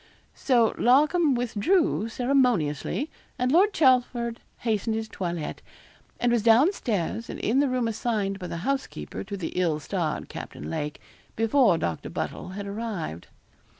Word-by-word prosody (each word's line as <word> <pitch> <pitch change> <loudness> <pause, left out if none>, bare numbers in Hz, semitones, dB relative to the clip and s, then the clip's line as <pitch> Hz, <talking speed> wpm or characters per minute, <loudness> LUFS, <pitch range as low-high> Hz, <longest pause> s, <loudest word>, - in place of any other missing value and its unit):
So 240 -5 +2
Larcom 295 +4 +4
withdrew 245 - +1
ceremoniously, 245 - +1 0.3
and 250 0 +1
Lord 380 +7 +5
Chelford 245 - +2 0.2
hastened 220 -1 0
his 220 0 -3
toilet, 170 -6 -4 0.6
and 245 - +2
was 235 -2 +3
down 235 - +5
stairs, 220 - -2
and - - -6
in 245 +5 +1
the 285 -1 +3
room 250 -2 0
assigned 210 -3 -1
by 180 - -5
the 170 - -5
housekeeper 275 0 -3
to 200 0 -6
the 180 - -3
ill 170 -4 0
starred 160 -1 -2
Captain 75 +2 -7
Lake, 150 - -3 0.4
before 225 -3 +4
Doctor 85 - -3
Buddle - - -4
had 200 +2 -6
arrived. 200 - -5
225 Hz, 145 wpm, -26 LUFS, 190-255 Hz, 0.6 s, Lord